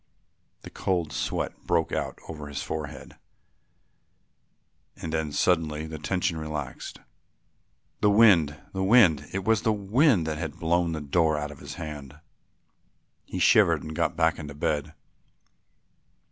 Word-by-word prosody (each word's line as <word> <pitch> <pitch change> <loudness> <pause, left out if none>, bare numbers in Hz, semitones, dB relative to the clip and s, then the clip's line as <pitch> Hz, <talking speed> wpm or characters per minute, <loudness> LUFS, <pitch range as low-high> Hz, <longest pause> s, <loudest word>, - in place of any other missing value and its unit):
The - - -10
cold 85 -6 -1
sweat 70 +3 -2
broke 85 -2 +1
out - - -3
on 75 -2 -7
his 70 -1 -5
forehead 75 -4 -6 1.8
and 80 - -6
then 80 -2 -1
suddenly 80 -1 +1
the 80 -1 -7
tension 90 +1 -1
relaxed, 75 -3 -6 1.0
"The 105 - +3
wind, 90 -9 +5
the 95 0 -1
wind; 95 - +5
it 95 0 -3
was 110 0 +2
the 110 - +2
wind 105 - +2
that 80 -1 -3
had 80 -4 -5
blown 85 0 +1
the 80 - -4
door 80 +1 +1
out 75 0 -4
of 75 - -12
his - - -8
hand." 75 -3 -8 1.1
He - - -6
shivered - - +4
and 80 0 -7
got - - 0
back 80 -1 +2
into 75 -2 -7
bed. 75 +1 -2
80 Hz, 140 wpm, -26 LUFS, 75-90 Hz, 1.8 s, wind